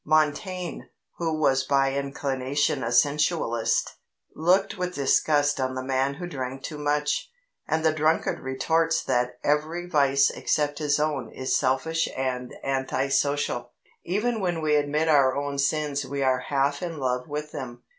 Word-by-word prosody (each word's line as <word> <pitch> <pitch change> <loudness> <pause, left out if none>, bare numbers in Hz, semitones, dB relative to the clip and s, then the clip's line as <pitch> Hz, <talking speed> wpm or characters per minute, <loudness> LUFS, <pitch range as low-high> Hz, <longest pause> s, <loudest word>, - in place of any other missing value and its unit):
Montaigne, 155 +4 0 0.4
who 160 -2 -1
was 135 -3 +3
by 135 0 +2
inclination 140 0 -1
a 115 - -2
sensualist, 145 -2 +1 0.4
looked 180 +6 +2
with 180 -2 -3
disgust 145 +1 +2
on 130 0 -1
the 130 - -3
man 135 +1 0
who 175 - -6
drank 135 -5 -5
too 150 -2 -6
much, 150 - 0 0.4
and 160 +1 0
the 160 - +4
drunkard 155 +1 +1
retorts 160 +5 0
that 125 -1 0
every 155 +4 0
vice 140 -5 +3
except 145 -1 -1
his 150 -1 +1
own 150 -5 -1
is 130 - -1
selfish 145 +5 +1
and 125 -1 -2
anti 135 0 -1
social. 135 -3 0 0.3
Even 220 +6 0
when 175 -3 0
we 155 -1 +2
admit 150 +2 +1
our 140 -4 +4
own 140 0 -3
sins 145 0 0
we 140 +1 -3
are 130 -1 +2
half 140 0 +1
in 170 -3 -4
love 125 -2 -1
with 150 +1 -5
them. 125 -4 -7
145 Hz, 155 wpm, -26 LUFS, 135-155 Hz, 0.4 s, the